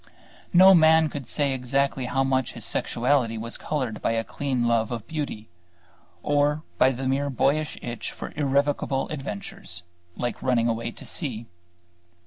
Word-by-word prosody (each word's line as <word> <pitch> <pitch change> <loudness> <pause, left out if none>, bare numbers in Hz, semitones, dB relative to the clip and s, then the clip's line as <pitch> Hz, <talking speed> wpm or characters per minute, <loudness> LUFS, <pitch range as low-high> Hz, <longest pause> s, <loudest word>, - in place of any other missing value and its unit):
No 190 +1 +8
man 160 -2 +6
could 140 -5 -6
say 140 0 +1
exactly 130 +1 0
how 135 +2 +1
much 130 -1 0
his - - -7
sexuality 120 -2 +1
was 115 +1 -5
colored 130 -8 -3
by - - +1
a 115 0 0
clean 130 -2 -1
love 115 -2 +2
of 115 -3 -4
beauty, 145 -9 -4 0.8
or 145 +1 +2 0.2
by 130 - +6
the 130 +1 -4
mere 140 +2 0
boyish 145 +4 0
itch 120 -1 -4
for - - -8
irrevocable 140 -1 0
adventures, 100 - -6 0.3
like 120 0 -3
running 120 -3 +2
away 115 0 -1
to - - -11
sea. 120 - -2
135 Hz, 150 wpm, -25 LUFS, 120-145 Hz, 0.8 s, No